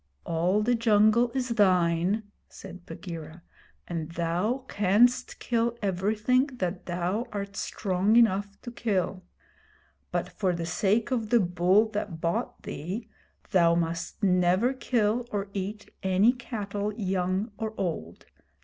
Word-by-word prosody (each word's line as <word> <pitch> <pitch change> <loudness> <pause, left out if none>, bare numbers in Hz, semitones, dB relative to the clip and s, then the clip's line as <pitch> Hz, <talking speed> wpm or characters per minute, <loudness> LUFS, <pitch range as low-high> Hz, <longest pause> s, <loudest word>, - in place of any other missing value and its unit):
'All 175 +5 +1
the 245 +3 +2
jungle 225 +1 +4
is 255 -1 -1
thine,' 185 -2 +2 0.3
said 180 -1 -11
Bagheera, 165 -1 -8 0.4
'and 165 -2 -4
thou 180 +10 -1
canst 215 +6 +2
kill 235 0 0
everything 215 +7 +1
that 185 -5 -3
thou 180 +6 -1
art 200 -1 -5
strong 195 +2 0
enough 200 -3 +3
to 240 - -6
kill; 195 -5 -1 0.9
but - - -1
for 185 -3 -1
the 170 -1 -3
sake 200 +8 +1
of 230 -4 -1
the 240 - +5
bull 180 +3 +3
that 205 -6 -4
bought 165 +1 -2
thee 190 +10 -5 0.4
thou 170 -2 +4
must 170 +4 -3
never 185 +6 +3
kill 240 -2 0
or 200 -1 -2
eat 205 +2 -5
any 190 +5 +4
cattle 210 -4 -4
young 190 +1 -1
or 220 0 -3
old. 155 - -4
200 Hz, 130 wpm, -27 LUFS, 180-225 Hz, 0.9 s, the